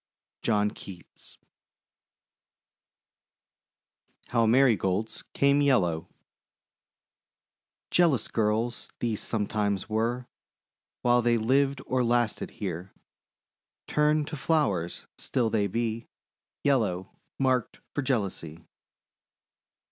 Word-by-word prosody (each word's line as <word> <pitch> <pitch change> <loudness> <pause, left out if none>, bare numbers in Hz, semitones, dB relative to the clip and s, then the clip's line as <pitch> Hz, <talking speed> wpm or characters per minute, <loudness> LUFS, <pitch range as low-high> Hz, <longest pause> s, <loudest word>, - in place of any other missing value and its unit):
JOHN 105 -2 +2
KEATS 90 -3 -10 2.9
HOW 115 -2 +3
MARIGOLDS 110 -4 +2
CAME 140 +1 +4
YELLOW 90 - +2 1.8
Jealous 160 -11 +3
girls 115 +2 -1
these 115 -3 -1
sometimes 105 -2 -1
were, 115 +3 0 0.8
While 120 0 +4
they 120 0 +3
lived 135 +4 +1
or 130 0 +1
lasted 120 -2 +1
here: 90 -2 -5 0.9
Turned 150 0 +2
to 155 - -4
Flowers, 105 - 0
still 120 -4 0
they 105 -2 +2
be 115 +2 -2 0.6
Yettow, 105 -10 +1 0.3
marked 130 -3 0
for 145 - -1
jealousy. 95 - -2
115 Hz, 80 wpm, -28 LUFS, 105-130 Hz, 2.9 s, CAME